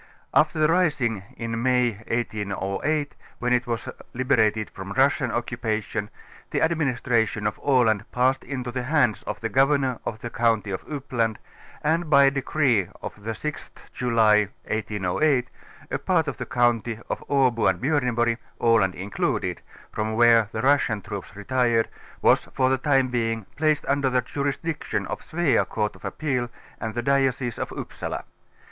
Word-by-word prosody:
After - - +3
the 155 0 +4
rising 145 - +1 0.2
in 115 0 -3
May 125 -1 +3 0.2
1808, 110 +6 -2 0.2
when 125 0 0
it 125 0 +1
was 115 -1 -3 0.3
liberat 115 -4 +3
ed 110 - -3
from 95 0 -8
the 100 - -5
Russian 135 0 +3
occupation, 110 -3 -2 0.4
the - - 0
administration 125 -9 +1
of 105 - -1
Aland 115 -7 +2
passed 130 +2 +2
into 125 -3 -4
the 125 +1 -2
hands 130 -4 +2
of 105 - -4
the 115 - -1
Governor 135 -1 +2
of 110 - -4
the 120 +1 -7
count;\' 115 -2 +2
of 95 -2 -4
Uppland 125 -6 -2 0.5
and 160 +2 +1
by 140 -2 +7
a 135 - +5
decree 135 - +1
of - - -6
tlie 105 +1 -14
6th 140 +6 -4 0.3
.luly 110 -4 +4 0.2
1808. 110 +6 0 0.4
a - - -1
4)arl - - +2
of - - -3
the - - -5
county 120 -2 +1
of - - -4
Abo 130 -7 +3
and 95 - -1
Bjorneborg, 120 -4 +1 0.2
Aland 110 -6 +3
included, 100 +3 -2 0.3
from 110 0 -2
where 115 -2 +5
the - - -3
Russian 130 -6 +3
troops 100 -1 -7
retired, 120 +1 +1 0.4
was - - +4
for 130 -1 +1
the 135 - +1
time 135 -2 +2
being 115 -3 -1
placed 155 0 +1
under 140 -1 +1
the 125 0 +2
jurisdiction 140 +5 -2
of - - -5
Svea 160 -4 +2
Court 105 -1 -1
of - - -17
Appeal 125 -6 -2 0.3
and 110 -1 -4
the 120 - -1
Diocese 135 -2 +1
of - - -3
Upsala. - - -5
120 Hz, 160 wpm, -25 LUFS, 110-135 Hz, 0.5 s, by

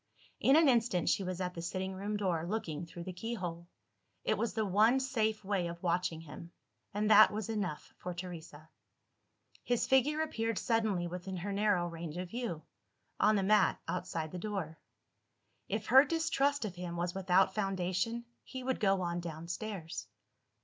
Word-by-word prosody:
In 270 - +5
an 320 -1 +6
instant, 230 -8 +3
she 195 - +2
was 185 -1 -4
at 180 -1 -2
the 170 - -6
sitting 190 +2 -3
room 205 +2 -3
door, 180 -5 0
looking 175 -6 -3
through 170 +1 -8
the 185 +1 -6
keyhole. 180 -4 -5 0.6
It - - +2
was 235 - -2
the 220 -1 +1
one 215 +7 +4
safe 220 -5 0
way 190 -3 0
of 170 +1 -8
watching 170 -2 0
him 165 +2 -10 0.4
and 210 +1 0
that 215 +1 +9
was 215 0 -4
enough 195 -8 -3
for 180 - -4
Teresa. 170 -4 -8 1.0
His 245 -1 +1
figure 285 +4 +3
appeared 230 -8 -1
suddenly 220 -6 +1
within 180 +2 -5
her 200 +3 -3
narrow 200 -4 +2
range 165 -1 -6
of 180 0 -4
view 230 -10 -4 0.6
on 215 +1 +5
the 195 - +1
mat 210 +2 +4
outside 170 -3 -3
the 180 - -5
door. 180 -5 -4 0.9
If - - -2
her 265 +1 +8
distrust 285 -4 +1
of 200 - -4
him 175 -1 -6
was 175 0 -1
without 190 0 +3
foundation, 195 +3 -1 0.2
he 260 -1 -7
would 260 0 -1
go 195 -2 +3
on 170 0 -1
downstairs. 170 - -5
190 Hz, 170 wpm, -33 LUFS, 175-220 Hz, 1.0 s, that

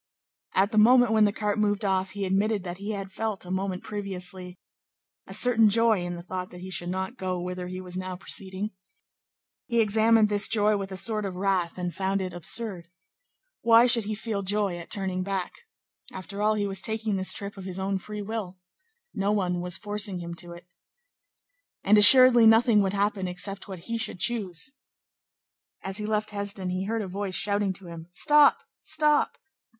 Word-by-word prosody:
At 195 +3 +2
the 215 - +3
moment 245 +1 +5
when 220 -1 +4
the 205 - +2
cart 210 0 -2
moved 205 0 0
off, 190 -1 -1
he 200 -1 -3
admitted 200 +2 0
that 180 0 -7
he 200 +2 -6
had 195 -1 -6
felt, 215 -1 -4
a 180 - -7
moment 190 -1 -3
previously, 185 -3 -2 0.7
a - - -9
certain 225 -3 +5
joy 225 -1 +3
in 175 0 -4
the 170 - -9
thought 185 0 -5
that 180 0 -12
he 185 +1 -8
should 175 -1 +1
not 190 +7 -4
go 185 -3 -3
whither 180 0 -5
he 185 +1 -6
was 180 -1 -9
now 185 0 -5
proceeding. 190 +2 -5 1.0
He 235 -1 0
examined 220 0 +4
this 205 0 +4
joy 210 -1 +3
with 195 -1 -5
a 190 - -5
sort 215 +3 +2
of 195 -2 -5
wrath, 185 -2 -1
and 180 -1 -4
found 195 +1 -1
it 185 -2 -4
absurd. 175 +1 -4 0.7
Why 230 +1 +6
should 235 -3 +3
he 215 +1 -3
feel 215 -1 -4
joy 200 -1 0
at 170 - -10
turning 190 -2 -3
back? 190 -1 -3 0.6
After 195 +2 -7
all, 215 +1 +2
he 205 -1 -1
was 195 -1 -2
taking 220 +1 -2
this 190 0 0
trip 200 0 -4
of 195 -2 -10
his 190 0 -6
own 195 0 -2
free 210 +2 -7
will. 200 -3 -5 0.6
No 200 +1 -1
one 180 -4 -1
was 180 0 -1
forcing 205 -2 -3
him 170 -1 -7
to 175 0 -8
it. 170 +1 -13 1.2
And 205 +2 +4
assuredly 245 +1 +8
nothing 225 -1 +5
would 195 -1 -1
happen 200 -1 -1
except 190 +3 -3
what 190 -3 -8
he 230 +5 -4
should 215 -4 -3
choose. 200 0 -2 1.1
As 195 +2 -2
he 210 - -4
left 215 0 -1
Hesdin, 200 -2 -2
he 185 +1 -3
heard 225 +1 -2
a - - -6
voice 190 0 -4
shouting 200 0 +1
to 190 0 -8
him: 165 -1 -10
"Stop! 295 - +4 0.2
Stop!" 300 -1 +1
200 Hz, 195 wpm, -26 LUFS, 185-215 Hz, 1.2 s, assuredly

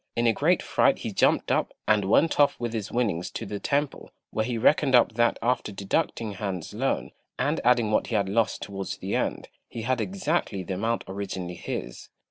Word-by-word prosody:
In 115 - +1
a 115 - +4
great - - +2
fright - - +3
he - - -5
jumped - - +2
up, - - 0
and 105 -2 +3
went 150 +12 +3
off 145 - +4
with 120 -1 -3
his 110 -4 -4
winnings 105 -8 0
to 115 - -6
the 100 0 -5
temple, 140 +3 -1 0.2
where 110 - 0
he 120 0 -2
reckoned 135 +3 +4
up 120 - +5
that 120 +1 +2
after 120 -3 0
deducting 105 +3 -1
Han's 95 -4 -5
loan, 130 +6 -1 0.3
and 145 +5 0
adding 120 -3 +3
what - - +2
he 115 - -2
had 100 -2 +2
lost 110 +3 0
towards 95 -1 -5
the - - -3
end, - - -2 0.2
he 115 - -6
had 125 0 0
exactly 175 - -1
the 95 - -4
amount 115 +5 -1
originally 95 -2 -4
his. 60 -7 -6
115 Hz, 200 wpm, -26 LUFS, 100-125 Hz, 0.3 s, up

